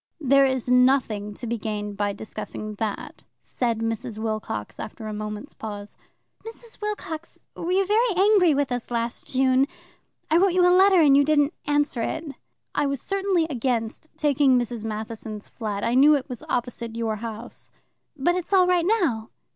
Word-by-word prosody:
"There 275 -2 +4
is 260 -2 -1
nothing 250 -5 +2
to 245 - -7
be 235 0 -2
gained 210 -1 -4
by 205 0 0
discussing 215 +1 -6
that," 215 -2 -4 0.2
said 235 -3 -2
Mrs. 225 0 -3
Wilcox 215 - -4
after 220 +1 -7
a 215 - -4
moment's 210 0 -6
pause. 205 -2 -7 0.5
"Mrs. 455 0 -12
Wilcox, 370 -6 -5
were 340 - -3
you 385 +1 +3
very 430 +1 +2
angry 385 -5 +5
with 280 -2 0
us 245 -1 -3
last 235 0 -3
June? 260 +1 +3 0.6
I 320 - +5
wrote 375 0 +4
you 360 -1 +4
a 360 - +5
letter 380 0 +6
and 290 -4 +6
you 285 - +6
didn't 290 0 +2
answer 290 -4 +1
it." 320 +7 -2 0.5
"I 290 - +1
was 275 -1 -2
certainly 390 0 0
against 245 0 -2
taking 280 -3 +3
Mrs. 240 -2 -2
Matheson's 215 -1 -6
flat. 210 -4 -4
I 230 - +1
knew 290 +4 +6
it 275 - -3
was 250 -4 -7
opposite 235 -2 -2
your 225 -2 -2
house." 230 +2 -8 0.5
"But 300 +6 +2
it's 365 +2 -3
all 370 -2 +6
right 360 -1 +2
now?" 310 - +1
255 Hz, 170 wpm, -24 LUFS, 220-320 Hz, 0.6 s, letter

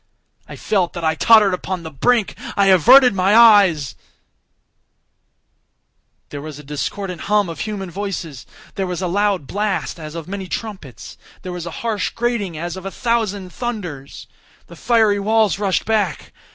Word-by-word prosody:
I - - -9
felt 190 -5 -1
that 170 - -6
I 160 0 +2
tottered 210 +3 +5
upon 180 -1 -4
the 160 - -8
brink—I 200 - 0
averted 245 - +7
my 195 +2 +2
eyes— 200 - +5 2.4
There 145 - -7
was 155 -1 -8
a 150 - -11
discordant 175 +6 -5
hum 205 -3 +2
of 165 - -7
human 200 -4 -5
voices! 175 -9 -6 0.3
There 195 -1 -3
was 180 +1 -4
a - - 0
loud 200 -3 0
blast 205 +1 -3
as 155 0 -8
of 165 -1 -7
many 195 0 -6
trumpets! 140 - -8 0.2
There 185 - -6
was 175 -1 -6
a 170 - -8
harsh 215 -4 -1
grating 230 -8 -2
as 170 +2 -5
of 190 - -9
a - - -3
thousand 205 -5 -2
thunders! 180 - -6 0.4
The - - -14
fiery 220 -4 +2
walls 215 -1 +1
rushed 195 -3 0
back! 210 -8 -1
195 Hz, 155 wpm, -19 LUFS, 170-210 Hz, 2.4 s, averted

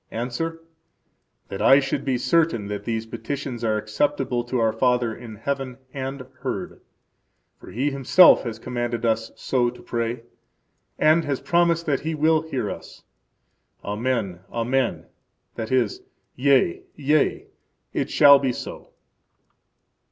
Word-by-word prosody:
–Answer: 165 +8 -4 0.9
That 95 - -5
I 135 - +7
should 135 - -2
be 130 -2 0
certain 155 -8 +1
that 105 0 -5
these 115 -1 -2
petitions 120 +2 -5
are 110 -1 +1
acceptable 120 +3 -1
to 125 +1 -2
our 115 -2 +2
Father 125 0 +1
in 115 -3 -10
heaven 135 +2 -4 0.2
and 135 -1 -5
heard; - - -5 0.8
for - - -13
He 135 +5 -1
Himself 140 +7 +6
has 115 -3 -5
commanded 120 0 -3
us 115 0 0
so 125 -2 0
to 125 - -12
pray, 115 0 -3 0.7
and 155 +2 +4
has 140 -2 -1
promised 170 -1 +2
that 140 -4 +1
He 160 +1 -3
will 155 +1 +3
hear 135 -9 -3
us. - - -10 0.8
Amen, 105 -3 -2
Amen; 125 +2 -1 0.5
that 110 0 -5
is, 125 -5 +1 0.3
Yea, 130 -9 +3
yea, 150 +1 +1 0.5
it - - -1
shall 140 -1 +7
be 135 -2 0
so. - - -8
125 Hz, 135 wpm, -23 LUFS, 115-140 Hz, 0.9 s, I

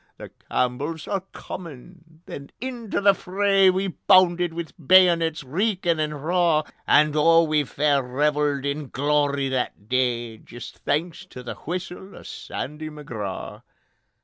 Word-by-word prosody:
'The - - -9 0.2
Campbells 145 +6 -2
are 195 -2 -1
Comin'': 165 0 -11
Then 140 0 -9
into 240 -4 -4
the 200 0 +6
fray 195 +1 +3
We 190 +1 0
bounded 180 -2 +3
wi' 170 0 -3 0.2
bayonets 170 -2 +4
reekin' 175 - 0
and 150 -1 -3
raw, 170 -3 +2 0.2
And 150 0 +4
oh 165 +2 +5
we 155 -2 +1
fair 145 +1 +1
revelled 145 +2 0
in 140 -1 -3
glory 145 0 +1
that 125 -5 -3
day, 120 -3 -1
Jist 120 -1 -11
thanks 165 +4 -2
to 125 -7 -10
the 120 - -5
whistle 180 +3 -7
o' - - -12
Sandy 155 +2 -6
McGraw... 115 -11 -7
155 Hz, 135 wpm, -24 LUFS, 140-180 Hz, 0.2 s, the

